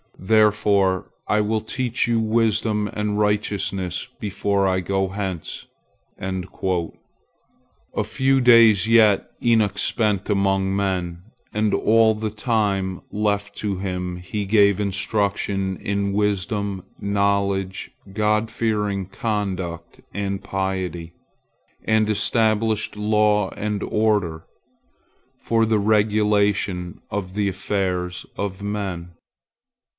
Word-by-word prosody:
Therefore 100 -2 +2 0.2
I 105 0 +2
will 110 +1 0
teach 120 +2 -1
you 115 -1 +2
wisdom 110 -1 +1
and 105 0 -1
righteousness 100 -3 -1
before 100 -1 0
I 95 0 +1
go 95 +1 -1
hence." 95 -4 -5 0.5
A 95 -2 -3 1.1
few 135 0 +1
days 115 -4 +6
yet 110 -3 +4
Enoch 110 -4 +3
spent 105 -1 0
among 95 -1 +1
men, 90 -3 -2 0.3
and 105 0 +1
all 110 0 +4
the 110 0 -3
time 100 -5 -1
left 105 -1 -1
to 100 -3 -2
him 90 -2 -3
he 100 +3 -4
gave 100 -1 +4
instruction 100 -1 -1
in 100 0 -2
wisdom, 100 -1 -1 0.2
knowledge, 100 -1 0 0.2
God 105 +2 +1
fearing 105 -4 -1
conduct, 95 -5 -4
and 100 -1 -3
piety, 95 -3 -3 0.7
and 110 -1 +2
established 110 0 +1
law 105 -1 +2
and 105 -1 -3
order, 105 -7 0 0.9
for 115 -1 +1
the 110 -1 +2
regulation 105 -3 +1
of 95 -2 -4
the 105 -1 +1
affairs 90 -2 -2
of 100 0 -4
men. 95 -4 -4
100 Hz, 100 wpm, -22 LUFS, 95-105 Hz, 1.1 s, days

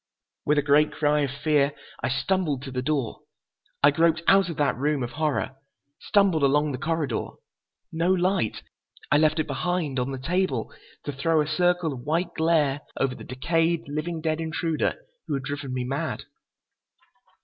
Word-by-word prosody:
With 150 - +3
a 145 - +3
great 150 +1 +4
cry 150 0 +1
of 140 -2 +1
fear 145 +1 +1 0.3
I - - 0
stumbled 145 0 0
to 135 - -7
the 125 0 -2
door. 135 -4 -1 0.6
I 145 - +8
groped 165 +2 +2
out 195 -2 +5
of 165 - -5
that 145 -2 +2
room 145 +1 0
of 120 - -4
horror, 150 -3 -1 0.4
stumbled 195 -6 +3
along 145 +2 +3
the 130 - -4
corridor. 160 -1 -1 0.6
No 165 +3 +1
light. 185 - +1 0.5
I 145 - +5
left 155 +1 +3
it 155 - +1
behind, 175 -7 -1
on 125 +1 -1
the 135 - -4
table, 165 -4 -1 0.3
to 145 - -3
throw 155 +4 +1
a 150 - +2
circle 175 0 +1
of 130 - -7
white 165 +7 -1
glare 155 -4 +2 0.2
over 135 -1 +1
the - - -10
decayed, 165 +5 0
living 155 +3 -3
dead 160 0 -1
intruder 160 0 -1 0.3
who 145 - -1
had 135 - -3
driven 140 -1 -4
me 125 -1 -2
mad. 135 +3 -3
150 Hz, 170 wpm, -25 LUFS, 140-165 Hz, 0.6 s, I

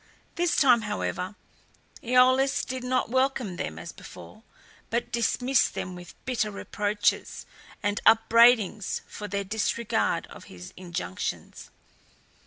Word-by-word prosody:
This 345 -1 0
time, 245 -5 +5
however, 205 -2 -3 0.7
AEolus 255 +2 +3
did 255 -1 -5
not 250 -2 0
welcome 260 -7 0
them 80 - -4
as 80 +1 -7
before, - - -13 0.5
but 235 +1 -2
dismissed 245 +3 +1
them 185 - -4
with 175 -1 -11
bitter 235 -4 0
reproaches 205 0 -1 0.4
and 205 0 -1
upbraidings 225 -3 +4
for 210 - -7
their 200 0 -2
disregard 220 +3 -1
of - - -13
his 90 0 -11
injunctions. 170 - -5
220 Hz, 115 wpm, -27 LUFS, 195-250 Hz, 0.7 s, time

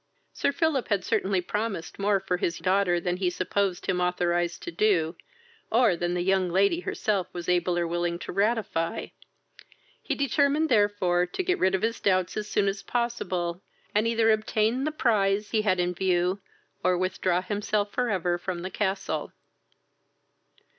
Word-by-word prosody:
Sir - - +1
Philip 315 -4 0
had 200 -3 0
certainly 190 -1 +1
promised 200 -2 -4
more 200 0 +2
for 185 -1 -2
his 170 -1 -1
daughter 185 -2 +2
than 180 +1 -2
he 185 -1 +1
supposed 185 +1 -1
him 180 -1 0
authorised 175 -1 0
to - - -5
do, 170 -3 +1 0.6
or 230 -5 +4
than 175 +1 -1
the 175 - 0
young 190 -1 +2
lady 200 - +2
herself 200 - -2
was 175 -1 -6
able 180 0 +1
or 175 - +1
willing 170 0 -1
to - - -7
ratify: 200 -4 -1 0.9
he - - -2
determined 285 +3 +2
therefore 205 -6 +2
to 375 - -3
get 365 0 0
rid 185 +1 +3
of 190 - -3
his 230 +1 0
doubts 185 -2 +1
as 210 0 -4
soon 205 -1 +1
as 195 +1 -1
possible, 185 -8 -2 0.3
and 215 +2 +2
either 225 -1 +3
obtain 215 +4 +1
the 310 - 0
prize 210 -7 +1
he 220 - +2
had 185 -4 +1
in 180 0 +1
view, 180 +1 0 0.4
or 180 - +3
withdraw 185 -1 0
himself 205 0 -1
for 250 +1 0
ever 175 -3 0
from 175 -1 -4
the 185 - -5
castle. 195 -1 -2
190 Hz, 165 wpm, -27 LUFS, 180-215 Hz, 0.9 s, or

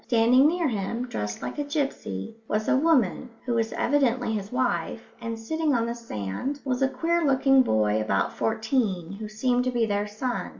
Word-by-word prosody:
Standing 245 +4 +5
near 340 0 +1
him, 230 +2 -2
dressed 105 - -4
like - - -5
a - - +1
gipsy, 275 - -3
was 215 +1 -1
a - - +4
woman, 265 - +2 0.2
who 245 - 0
was 225 -1 0
evidently 255 -4 +1
his 205 -1 -4
wife, 250 -2 -2
and 230 -1 -4
sitting 305 +5 0
on 230 -1 +1
the 235 - -2
sand 230 - -4
was 255 -1 -1
a 270 - +4
queer 335 +5 0
looking 270 -1 +4
boy 110 - +2
about 100 -2 0
fourteen 220 -6 -1
who 210 +2 -7
seemed 245 +3 +1
to - - +2
be 240 -2 +1
their 205 -1 -1
son. 240 +4 -3
235 Hz, 185 wpm, -26 LUFS, 210-270 Hz, 0.2 s, Standing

